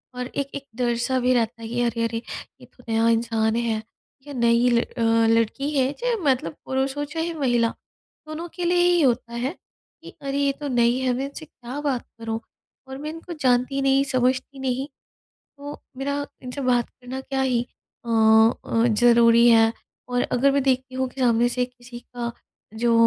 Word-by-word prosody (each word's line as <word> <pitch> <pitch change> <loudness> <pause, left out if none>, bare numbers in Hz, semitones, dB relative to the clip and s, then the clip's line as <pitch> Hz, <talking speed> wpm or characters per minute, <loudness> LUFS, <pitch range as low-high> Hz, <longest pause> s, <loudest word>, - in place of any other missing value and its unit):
और 250 0 -4
एक 275 +1 -4
एक 280 - -5
डर-सा 245 +1 0
भी 250 +1 +2
रहता 230 -1 0
है 225 - -6
कि 240 +2 -2
अरे, 235 -1 0
अरे! 230 0 -1 0.4
ये - - -12
तो 250 - -22
नया 225 0 +2
इंसान 225 -1 +1
है 230 -2 0 0.5
या 290 - -7
नई 235 -1 +3
ल 240 -1 +4
अ, 240 - -8 0.3
लड़की 230 +5 0
है 265 0 +2
चाहे - - 0
मतलब 245 -11 0
पुरुष 265 +1 -1
हो 290 - -1
चाहे 330 +1 -2
महिला, 240 -6 +1 0.6
दोनों 310 +3 -5
के 355 - -3
लिए 350 0 +3
ही 350 -1 +3
होता 240 -3 +1
है 285 +8 -2 0.5
कि - - -11
अरे! 275 0 -3
ये 280 0 +2
तो 290 - -3
नई 235 +1 +4
है 255 -1 +1
मैं 260 +2 -2
इनसे 280 +3 -8
क्या 255 -1 -8
बात 270 -5 -1
करूँ? 225 0 -3 0.5
और 265 - -7
मैं 300 +2 -5
इनको 330 +2 -8
जानती 255 +2 +2
नहीं, 270 0 +3
समझती 260 +1 0
नहीं। 265 +1 -2 0.7
तो 285 +1 -8 0.2
मेरा 280 +1 -2 0.2
इनसे 250 +2 -5
बात 245 -2 +1
करना 255 +1 -8
क्या 270 0 -2
ही 255 -3 +1 0.4
अ - - -6
अ, 225 0 +4
ज़रूरी 235 +1 +5
है? 225 -1 +6 0.4
और 245 0 +1
अगर 275 +3 +3
मैं 280 0 +1
देखती 260 -1 0
हूँ 260 0 0
कि 265 - -7
सामने 240 -1 +3
से 250 0 0
किसी 245 -1 -12
का 240 -1 -6 0.4
जो 230 +1 +1
250 Hz, 190 wpm, -24 LUFS, 235-275 Hz, 0.7 s, है